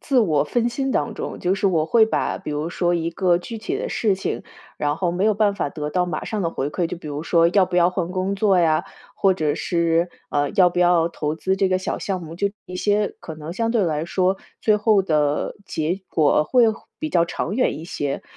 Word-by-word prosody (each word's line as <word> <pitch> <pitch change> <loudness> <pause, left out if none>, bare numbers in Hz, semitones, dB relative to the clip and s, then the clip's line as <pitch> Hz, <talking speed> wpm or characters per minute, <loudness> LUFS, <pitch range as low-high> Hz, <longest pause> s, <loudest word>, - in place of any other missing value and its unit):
自 270 -3 +1
我 160 -10 +3
分 240 +8 0
心 270 +2 -2
当 230 - -1
中， - - -5
就 180 +2 +1
是 200 - 0
我 160 -4 +2
会 225 +4 +5
把 - - -1
比 190 - -6
如 150 +2 -2
说 175 0 +1
一 165 0 -1
个 175 0 +2
具 225 +5 -7
体 365 - -3
的 - - -3
事 215 - +1
情， 190 - -3 0.3
然 145 0 -1
后 175 -1 0
没 185 +3 0
有 215 -1 +3
办 205 -1 +2
法 170 -7 -2
得 150 0 -5
到 180 +1 +1
马 175 - -4
上 215 -2 -3
的 165 - 0
回 140 -2 -3
馈， 175 +1 -1
就 165 - -5
比 160 - -11
如 145 +1 -4
说 170 0 +3
要 185 0 +3
不 180 - -3
要 175 0 +5
换 180 -2 -2
工 190 +1 -1
作 195 -2 +3
呀， 160 -2 +2 0.3
或 195 -1 +3
者 155 -4 0
是， 170 0 +1 0.2
呃， 145 0 0
要 185 -4 +5
不 175 - -4
要 175 -2 +4
投 155 -2 -3
资 190 +4 0
这 195 -1 +2
个 185 0 +1
小 185 - -3
项 190 -2 -3
目， 165 0 -8
就 200 +3 0 0.2
一 180 - -8
些 205 +2 +1
可 160 - -8
能 155 +2 -7
相 230 +4 -1
对 230 -4 +2
来 155 -2 -1
说 185 +2 +1 0.2
最 215 -1 +3
后 210 -2 +3
的 150 -4 0
结 160 +5 -2
果 150 -1 +3
会 245 +5 +4 0.3
比 310 - -3
较 170 - +3
长 175 +3 -3
远 240 - +1
一 160 - -8
些。 145 -5 -3
180 Hz, 260 characters per minute, -22 LUFS, 160-200 Hz, 0.3 s, 会